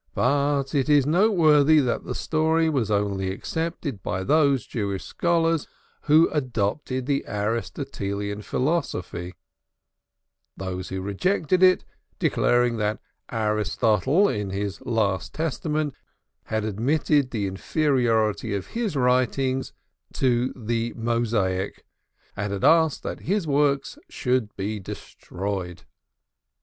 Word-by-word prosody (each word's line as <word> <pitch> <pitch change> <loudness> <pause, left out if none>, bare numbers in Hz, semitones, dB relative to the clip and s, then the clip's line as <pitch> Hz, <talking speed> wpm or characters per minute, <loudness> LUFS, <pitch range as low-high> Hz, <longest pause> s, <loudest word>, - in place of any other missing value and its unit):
But 140 +1 +1
it 140 -1 +1
is 145 -3 +5
noteworthy 155 -4 +4
that 125 -5 0
the - - -4
story 160 +1 +1
was 125 -8 0
only 100 -2 0
accepted 155 - -4
by 95 +1 -3
those 140 -1 +3
Jewish 100 -4 -3
scholars 165 -2 +1 0.4
who 155 +2 +6
adopted 130 -1 -1
the 140 0 0
Aristotelian 105 -1 -3
philosophy, 125 - -2 1.2
those 95 -1 -5
who 95 0 -4
rejected 170 - 0
it 185 -1 +5 0.3
declaring 120 -1 +2
that 105 +1 -1 0.3
Aristotle 110 - +2
in 105 - -2
his 100 +1 -4
last 100 -5 0
testament 155 -1 -1 0.5
had 110 -1 -2
admitted 135 +6 +1
the 110 -5 -2
inferiority 110 - +1
of 100 - -3
his 230 -8 -2
writings 130 +1 +1 0.4
to 125 -1 +1
the 115 -1 -2
Mosaic, 115 -5 -1 0.5
and 100 0 -3
had 100 -1 -4
asked 160 -2 +4
that - - -4
his 195 +1 -1
works 145 - +1
should 125 -4 -1
be 105 +2 -3
destroyed. 95 -1 -6
125 Hz, 110 wpm, -24 LUFS, 105-150 Hz, 1.2 s, who